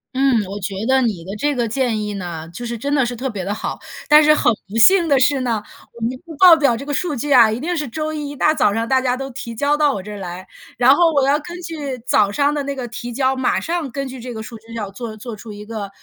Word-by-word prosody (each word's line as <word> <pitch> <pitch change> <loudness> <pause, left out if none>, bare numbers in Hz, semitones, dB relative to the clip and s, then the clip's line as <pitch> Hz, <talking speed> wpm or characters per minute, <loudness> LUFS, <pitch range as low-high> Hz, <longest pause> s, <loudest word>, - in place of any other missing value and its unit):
嗯， 260 -5 +3
我 200 +2 -6
觉 195 +1 -4 0.2
得 265 0 +4
你 205 -9 -1
的 195 +3 -7
这 290 +2 0
个 235 -2 -1
建 230 -2 0
议 210 - -4
呢， 170 -4 -6
就 240 - -7
是 235 0 -4
真 285 +5 -2
的 270 -4 +3
是 245 0 -4
特 265 +3 -3
别 195 -6 -5
地 200 - -2
好。 215 - -5 0.3
但 300 +1 +8
是 305 0 +5
很 240 - +3 0.2
不 205 - -9
幸 345 - +6
的 280 -3 +4
是 260 +2 +3
呢， 230 -4 -1 0.3
我 235 - -12
们 240 - 0 0.3
报 360 0 +9
表 280 -6 +3
这 260 +5 -7
个 290 - -3
数 305 0 -1
据 285 +4 -3
啊， 235 -4 +7
一 225 +4 -3
定 350 +2 -2
是 295 -3 -2
周 310 +5 -3
一 295 -2 -4
一 - - -8
大 300 +3 +3
早 205 -9 +2
上 225 +1 -1
大 260 +3 +2
家 255 -1 0
都 270 +1 -5
提 240 -3 -7
交 290 +5 +1
到 295 -2 +3
我 190 - -5
这 210 - -8
儿 205 - -7
来， 185 -1 -7 0.3
然 250 +3 +6
后 330 +1 +3
我 280 -2 +3
要 285 +2 +3
根 345 +3 -9
据 295 -6 -5
早 210 -5 +3
上 285 +8 +1
的 295 - -1
那 280 0 -4
个 255 -2 -5
提 240 +1 -6
交， 265 +1 +1
马 260 - +1
上 335 -4 -2
根 275 +2 -4
据 260 0 -8
这 245 0 -7
个 220 0 -6
数 230 +1 -9
据， 225 +1 -14
要 210 -4 -5
做 220 +2 -7
做 225 +2 -8
出 215 0 -9
一 210 0 -10
个， 215 -3 -6
250 Hz, 310 characters per minute, -19 LUFS, 220-285 Hz, 0.3 s, 报